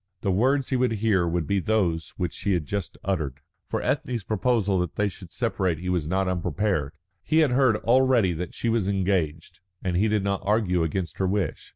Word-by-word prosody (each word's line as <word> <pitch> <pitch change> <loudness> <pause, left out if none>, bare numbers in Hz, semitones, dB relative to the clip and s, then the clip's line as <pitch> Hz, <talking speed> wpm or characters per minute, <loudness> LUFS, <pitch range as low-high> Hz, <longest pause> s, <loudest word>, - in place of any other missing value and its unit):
The 100 - 0
words 130 +8 +2
he 130 - +1
would 125 -2 +2
hear 100 -5 +2
would 85 -1 -1
be 100 +6 +1
those 90 -5 0
which 90 -3 -2
she 100 - -1
had 85 -4 0
just 100 +2 -4
uttered. 75 -8 -2 0.3
For - - -2
Ethne's 125 -4 -1
proposal 105 -2 +1
that 90 -2 -2
they 105 - +1
should 90 -3 -9
separate 95 -8 -1
he 90 +3 -5
was 90 -5 0
not 95 +3 0
unprepared. 90 -4 -1 0.3
He 155 - 0
had 155 -5 +4
heard 125 -3 +4
already 120 -4 +3
that 85 +2 -5
she - - -2
was 115 -4 +1
engaged, 90 -4 -1 0.2
and 90 -2 -1
he 100 +5 +3
did 105 -2 +1
not 100 -1 -1
argue 100 -4 +1
against 85 +2 -2
her 95 - +2
wish. 95 -4 -2
95 Hz, 205 wpm, -25 LUFS, 90-110 Hz, 0.3 s, had